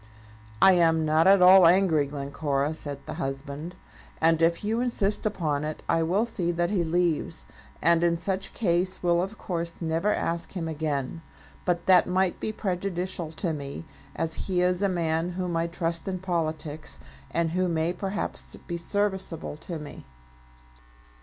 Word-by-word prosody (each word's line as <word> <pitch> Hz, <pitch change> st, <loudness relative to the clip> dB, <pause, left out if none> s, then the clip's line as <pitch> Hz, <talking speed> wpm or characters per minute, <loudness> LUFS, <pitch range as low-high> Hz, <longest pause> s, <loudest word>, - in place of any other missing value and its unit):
"I 190 Hz, -, +9 dB
am 165 Hz, -3 st, +3 dB
not 155 Hz, +3 st, +3 dB
at 195 Hz, -1 st, +7 dB
all 185 Hz, -1 st, +9 dB
angry, 170 Hz, -5 st, +4 dB
Glencora," 140 Hz, +1 st, -2 dB
said 145 Hz, -3 st, -5 dB
the -, -, -5 dB
husband; 140 Hz, +5 st, -5 dB, 0.4 s
"and 165 Hz, 0 st, +3 dB
if 165 Hz, +3 st, +2 dB
you 225 Hz, +3 st, 0 dB
insist 215 Hz, -4 st, 0 dB
upon 155 Hz, -8 st, -1 dB
it, 155 Hz, 0 st, -5 dB
I 165 Hz, -, +2 dB
will 185 Hz, +7 st, +2 dB
see 185 Hz, -7 st, -1 dB
that 175 Hz, +2 st, 0 dB
he 190 Hz, -5 st, +1 dB
leaves; 165 Hz, -, 0 dB, 0.4 s
and 170 Hz, +1 st, +4 dB
in 170 Hz, -1 st, +3 dB
such 190 Hz, +3 st, -3 dB
case 185 Hz, -3 st, 0 dB
will 175 Hz, -1 st, +3 dB
of 195 Hz, +4 st, -4 dB
course 170 Hz, -2 st, -4 dB
never 165 Hz, +5 st, 0 dB
ask 170 Hz, -3 st, -2 dB
him 170 Hz, -4 st, -3 dB
again. 150 Hz, -1 st, -3 dB, 0.4 s
But 175 Hz, -1 st, 0 dB
that 185 Hz, -1 st, +6 dB
might 185 Hz, 0 st, +1 dB
be 220 Hz, -, -2 dB
prejudicial 180 Hz, -4 st, -3 dB
to 160 Hz, +1 st, -2 dB
me, 140 Hz, +2 st, -6 dB, 0.3 s
as 160 Hz, 0 st, -2 dB
he 180 Hz, -2 st, +1 dB
is 180 Hz, +1 st, +1 dB
a 200 Hz, -, +2 dB
man 170 Hz, -1 st, -1 dB
whom 180 Hz, -1 st, -2 dB
I 165 Hz, 0 st, +1 dB
trust 170 Hz, 0 st, -3 dB
in 190 Hz, -1 st, -2 dB
politics, 160 Hz, -4 st, -3 dB, 0.3 s
and 165 Hz, -1 st, 0 dB
who 185 Hz, +2 st, +1 dB
may 165 Hz, 0 st, 0 dB
perhaps 195 Hz, +2 st, -4 dB
be 170 Hz, -, -3 dB
serviceable 190 Hz, -3 st, -2 dB
to 165 Hz, +2 st, -6 dB
me." 150 Hz, -, -10 dB
170 Hz, 165 wpm, -27 LUFS, 160-185 Hz, 0.4 s, I